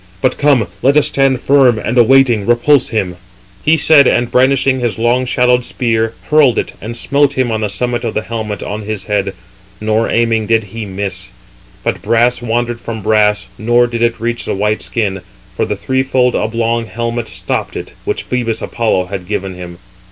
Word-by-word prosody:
But 130 Hz, +6 st, 0 dB
come, 140 Hz, -6 st, +3 dB, 0.2 s
let 140 Hz, +3 st, +3 dB
us 150 Hz, -, +4 dB
stand 135 Hz, -2 st, +1 dB
firm, 130 Hz, -4 st, +4 dB
and 115 Hz, +2 st, -3 dB
awaiting, 120 Hz, -3 st, +4 dB
repulse 125 Hz, +3 st, +3 dB
[him]." 95 Hz, -6 st, -2 dB, 0.5 s
He 160 Hz, +2 st, +4 dB
said, 150 Hz, -2 st, +6 dB
and 120 Hz, 0 st, +1 dB
brandishing 130 Hz, +1 st, +2 dB
his 120 Hz, -3 st, -2 dB
long 120 Hz, +3 st, +1 dB
shadowed 125 Hz, -1 st, +2 dB
spear, 115 Hz, -3 st, -1 dB, 0.2 s
hurled 145 Hz, -6 st, +4 dB
it, -, -, -2 dB
and 115 Hz, +2 st, -5 dB
smote 140 Hz, +2 st, +1 dB
him 130 Hz, -3 st, 0 dB
on 110 Hz, 0 st, -1 dB
the 105 Hz, -, -1 dB
summit 120 Hz, +4 st, -2 dB
of 115 Hz, -, -3 dB
the 110 Hz, -, -1 dB
helmet 110 Hz, -3 st, -5 dB
on 105 Hz, +1 st, -5 dB
his 105 Hz, -2 st, -4 dB
head; 100 Hz, -1 st, -2 dB, 0.4 s
nor, 110 Hz, +1 st, 0 dB
aiming 115 Hz, -2 st, +1 dB
did 115 Hz, -1 st, +2 dB
he 115 Hz, -2 st, -5 dB
miss. 95 Hz, -1 st, -5 dB, 0.5 s
But -, -, -2 dB
brass 120 Hz, +2 st, +2 dB
wandered 120 Hz, 0 st, -2 dB
from 110 Hz, -3 st, -6 dB
brass, 105 Hz, -2 st, +2 dB
nor 120 Hz, +2 st, +3 dB
did 120 Hz, -1 st, -4 dB
it 115 Hz, -1 st, +1 dB
reach 120 Hz, +1 st, -2 dB
the -, -, -2 dB
white 105 Hz, +2 st, 0 dB
skin; 100 Hz, -5 st, -2 dB, 0.3 s
for -, -, 0 dB
the -, -, -2 dB
threefold 130 Hz, -1 st, 0 dB
oblong 115 Hz, +1 st, -1 dB
helmet 115 Hz, 0 st, -3 dB
stopped -, -, -4 dB
it, -, -, -7 dB
which -, -, -3 dB
Phœbus 120 Hz, -3 st, -2 dB
Apollo 110 Hz, -6 st, 0 dB
had 95 Hz, -1 st, -6 dB
given 95 Hz, 0 st, -3 dB
him. 90 Hz, -1 st, -9 dB
115 Hz, 185 wpm, -15 LUFS, 110-125 Hz, 0.5 s, said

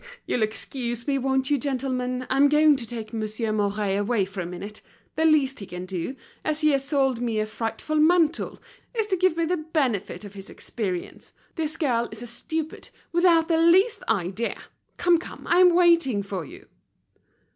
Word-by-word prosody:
you'll 245 Hz, -, -1 dB
excuse 235 Hz, +2 st, -2 dB
me, 275 Hz, -1 st, +1 dB
won't 265 Hz, +1 st, 0 dB
you, 290 Hz, -, +3 dB
gentlemen? 255 Hz, -2 st, -2 dB
I'm 275 Hz, +2 st, +4 dB
going 300 Hz, 0 st, +5 dB
to 240 Hz, -4 st, -5 dB
take 225 Hz, -2 st, -7 dB
Monsieur 220 Hz, 0 st, -2 dB
Mouret 205 Hz, -1 st, 0 dB
away 205 Hz, -1 st, +1 dB
for 190 Hz, 0 st, -6 dB
a 170 Hz, -, -4 dB
minute. 200 Hz, +4 st, -8 dB, 0.3 s
The 320 Hz, -, +1 dB
least 285 Hz, -4 st, +3 dB
he 200 Hz, -, -8 dB
can 180 Hz, +1 st, -6 dB
do, 185 Hz, +7 st, -4 dB, 0.3 s
as 310 Hz, 0 st, -1 dB
he 305 Hz, -, +4 dB
has 275 Hz, -1 st, +1 dB
sold 270 Hz, -4 st, +1 dB
me 230 Hz, -3 st, -1 dB
a 215 Hz, -, +1 dB
frightful 225 Hz, +7 st, -3 dB
mantle, 330 Hz, +1 st, +2 dB, 0.4 s
is 445 Hz, -2 st, +1 dB
to 405 Hz, -2 st, 0 dB
give 370 Hz, -2 st, +2 dB
me 335 Hz, -, +1 dB
the 360 Hz, +2 st, 0 dB
benefit 270 Hz, -, -2 dB
of 200 Hz, -, -10 dB
his 195 Hz, 0 st, -10 dB
experience. 185 Hz, -6 st, -5 dB, 0.2 s
This 315 Hz, -3 st, -2 dB
girl 240 Hz, -7 st, 0 dB
is 220 Hz, +2 st, -8 dB
a -, -, -6 dB
stupid, 310 Hz, +7 st, -5 dB, 0.2 s
without 340 Hz, -2 st, +4 dB
the 325 Hz, -2 st, +2 dB
least 370 Hz, +7 st, +4 dB
idea. 200 Hz, +2 st, -1 dB, 0.4 s
Come, 350 Hz, -1 st, +4 dB
come! -, -, -10 dB
I'm 355 Hz, 0 st, +5 dB
waiting 335 Hz, -, +4 dB
for 195 Hz, -4 st, -5 dB
you." -, -, -13 dB
260 Hz, 180 wpm, -25 LUFS, 215-315 Hz, 0.4 s, going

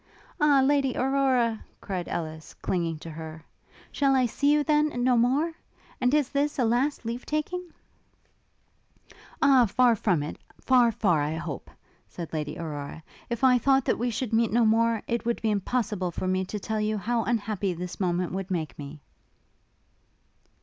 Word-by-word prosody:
'Ah, 290 Hz, -3 st, +5 dB
Lady 275 Hz, -2 st, +2 dB
Aurora!' 255 Hz, -4 st, +1 dB, 0.2 s
cried 185 Hz, -3 st, -4 dB
Ellis, 160 Hz, -2 st, -5 dB
clinging 170 Hz, -3 st, -2 dB
to 165 Hz, +1 st, -9 dB
her, 160 Hz, 0 st, -9 dB, 0.5 s
'shall 275 Hz, -2 st, +2 dB
I 255 Hz, -1 st, +3 dB
see 285 Hz, +5 st, +1 dB
you, 295 Hz, 0 st, +3 dB
then, 300 Hz, -4 st, +1 dB
no 250 Hz, 0 st, +4 dB
more? 270 Hz, +8 st, +2 dB, 0.5 s
And 250 Hz, 0 st, +3 dB
is 295 Hz, -3 st, +2 dB
this 285 Hz, +1 st, 0 dB
a 250 Hz, -, +2 dB
last 245 Hz, +4 st, 0 dB
leave 235 Hz, +2 st, -4 dB
taking?' 350 Hz, +4 st, -3 dB, 1.7 s
'O, 265 Hz, -4 st, +6 dB
far 245 Hz, +3 st, +4 dB
from 180 Hz, -8 st, +1 dB
it, 150 Hz, -, -6 dB, 0.2 s
far, 245 Hz, -3 st, +4 dB
far, 180 Hz, -8 st, +1 dB
I 150 Hz, +2 st, -1 dB
hope!' 160 Hz, -4 st, -6 dB, 0.4 s
said 170 Hz, -2 st, -8 dB
Lady 150 Hz, -1 st, -3 dB
Aurora: 155 Hz, -1 st, -6 dB, 0.3 s
'if 235 Hz, +1 st, -4 dB
I 250 Hz, -1 st, +6 dB
thought 270 Hz, +1 st, +3 dB
that -, -, +1 dB
we 245 Hz, +1 st, 0 dB
should 230 Hz, 0 st, -3 dB
meet 225 Hz, 0 st, +3 dB
no 235 Hz, +1 st, +3 dB
more, 225 Hz, 0 st, +2 dB
it 235 Hz, 0 st, -1 dB
would 235 Hz, 0 st, -1 dB
be 220 Hz, -, 0 dB
impossible 210 Hz, -2 st, -1 dB
for 180 Hz, +2 st, -4 dB
me 185 Hz, 0 st, 0 dB
to 210 Hz, +3 st, -5 dB
tell 215 Hz, +1 st, -2 dB
you 215 Hz, 0 st, 0 dB
how 230 Hz, +3 st, 0 dB
unhappy 210 Hz, -4 st, -1 dB
this 180 Hz, +1 st, -6 dB
moment 180 Hz, -1 st, 0 dB
would 190 Hz, +1 st, -4 dB
make 160 Hz, -8 st, -3 dB
me!' 145 Hz, +1 st, -8 dB
230 Hz, 170 wpm, -27 LUFS, 180-255 Hz, 1.7 s, O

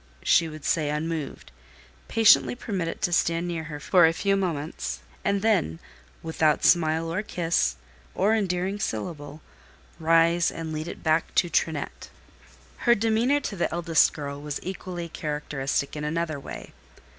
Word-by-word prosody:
she 165 Hz, -1 st, +4 dB
would 155 Hz, -1 st, -10 dB
say 155 Hz, -5 st, +1 dB
unmoved, 155 Hz, -, -4 dB, 0.6 s
patiently 225 Hz, +1 st, +5 dB
permit 195 Hz, -8 st, -3 dB
it 165 Hz, -, -6 dB
to 175 Hz, -, +1 dB
stand 170 Hz, 0 st, +1 dB
near 165 Hz, -2 st, -3 dB
her 150 Hz, -2 st, -7 dB, 0.3 s
a -, -, +3 dB
few 195 Hz, +4 st, +1 dB
moments, 165 Hz, -5 st, -3 dB, 0.2 s
and 200 Hz, 0 st, 0 dB
then, 195 Hz, -, +2 dB, 0.5 s
without 160 Hz, -1 st, +1 dB
smile 165 Hz, -1 st, +3 dB
or 195 Hz, -, 0 dB
kiss, 165 Hz, -, 0 dB, 0.4 s
or 205 Hz, +4 st, +3 dB
endearing 190 Hz, -1 st, -1 dB
syllable, 145 Hz, -, -4 dB, 0.6 s
rise 165 Hz, +1 st, +4 dB
and 160 Hz, -1 st, -6 dB
lead 155 Hz, +1 st, -4 dB
it -, -, -8 dB
back 160 Hz, 0 st, +1 dB
to 175 Hz, -, +2 dB
Trinette. 160 Hz, -3 st, -2 dB, 0.7 s
Her 240 Hz, -, +4 dB
demeanour 230 Hz, +6 st, +2 dB
to 210 Hz, -, -4 dB
the 175 Hz, -, -1 dB
eldest 170 Hz, -2 st, +3 dB
girl 140 Hz, -1 st, -6 dB
was 150 Hz, -1 st, -4 dB
equally 180 Hz, -2 st, -5 dB
characteristic 150 Hz, -3 st, -3 dB
in 150 Hz, -, -4 dB
another 160 Hz, -1 st, -2 dB
way. -, -, -9 dB
165 Hz, 145 wpm, -26 LUFS, 155-185 Hz, 0.7 s, patiently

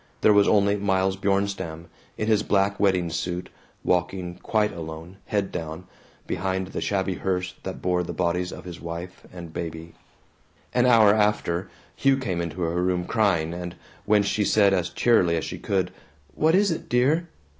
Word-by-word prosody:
There 105 Hz, -, +6 dB
was 100 Hz, -1 st, +5 dB
only 100 Hz, -1 st, +3 dB
Miles 95 Hz, -1 st, +1 dB
Bjornstam, 95 Hz, -4 st, -1 dB, 0.3 s
in 110 Hz, -, -1 dB
his 110 Hz, -1 st, +3 dB
black 100 Hz, -1 st, +1 dB
wedding 90 Hz, -4 st, +2 dB
suit, 85 Hz, +2 st, -3 dB, 0.3 s
walking 90 Hz, 0 st, -1 dB
quite 105 Hz, -1 st, 0 dB
alone, 80 Hz, +2 st, -8 dB
head 100 Hz, -2 st, -1 dB
down, 80 Hz, +2 st, -5 dB, 0.4 s
behind 95 Hz, +1 st, -2 dB
the -, -, -4 dB
shabby 95 Hz, -1 st, 0 dB
hearse 90 Hz, 0 st, -2 dB
that 95 Hz, -, -7 dB
bore 90 Hz, -1 st, +1 dB
the 90 Hz, -, -4 dB
bodies 90 Hz, +1 st, -1 dB
of -, -, -9 dB
his 90 Hz, -1 st, -8 dB
wife 85 Hz, +2 st, -7 dB
and 85 Hz, -3 st, -9 dB
baby. 80 Hz, 0 st, -6 dB, 0.8 s
An 125 Hz, 0 st, +3 dB
hour 110 Hz, -4 st, +6 dB
after, 105 Hz, -4 st, +1 dB, 0.3 s
Hugh 135 Hz, -1 st, +3 dB
came 95 Hz, -10 st, -2 dB
into 85 Hz, +1 st, -5 dB
her 85 Hz, +1 st, 0 dB
room 90 Hz, -1 st, 0 dB
crying, 90 Hz, -8 st, +1 dB
and 90 Hz, 0 st, -6 dB, 0.3 s
when 105 Hz, -1 st, +4 dB
she 105 Hz, +1 st, 0 dB
said 100 Hz, -1 st, +4 dB
as 90 Hz, -3 st, 0 dB
cheerily 90 Hz, -9 st, +3 dB
as 80 Hz, -, -2 dB
she -, -, -6 dB
could, 95 Hz, -2 st, -1 dB, 0.4 s
"What 160 Hz, +2 st, +3 dB
is 200 Hz, 0 st, +3 dB
it, 165 Hz, -, -4 dB
dear?" 145 Hz, +8 st, +2 dB
95 Hz, 170 wpm, -25 LUFS, 85-105 Hz, 0.8 s, There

